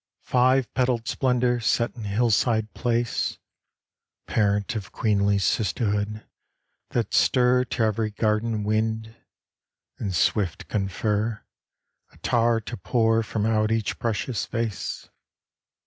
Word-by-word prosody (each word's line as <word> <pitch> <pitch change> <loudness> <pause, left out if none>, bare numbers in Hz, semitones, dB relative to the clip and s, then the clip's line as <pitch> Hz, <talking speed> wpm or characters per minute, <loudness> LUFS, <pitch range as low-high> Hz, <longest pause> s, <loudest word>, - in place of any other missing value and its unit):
Five 130 0 +2
petaled 125 -3 0
splendor 125 -2 +1
set 115 +1 0
in 115 -4 -7
hillside 110 +1 +1
place, 120 -1 -1 0.9
Parent 105 +2 0
of 100 -3 -5
queenly 100 -2 +2
sisterhood 105 +2 0 0.6
that 115 -4 -2
stir 125 0 +4
To 120 -1 -1
every 110 0 0
garden 110 +1 0
wind, 110 +1 -1 0.8
and 95 -3 -2
swift 90 0 0
confer 105 +2 -1 0.7
Attar 115 -1 +1
to 120 +2 -7
pour 115 -2 +2
from 110 -1 -2
out 110 -1 +2
each 115 -2 -1
precious 115 0 -2
vase! 115 -3 -3
110 Hz, 105 wpm, -25 LUFS, 105-120 Hz, 0.9 s, stir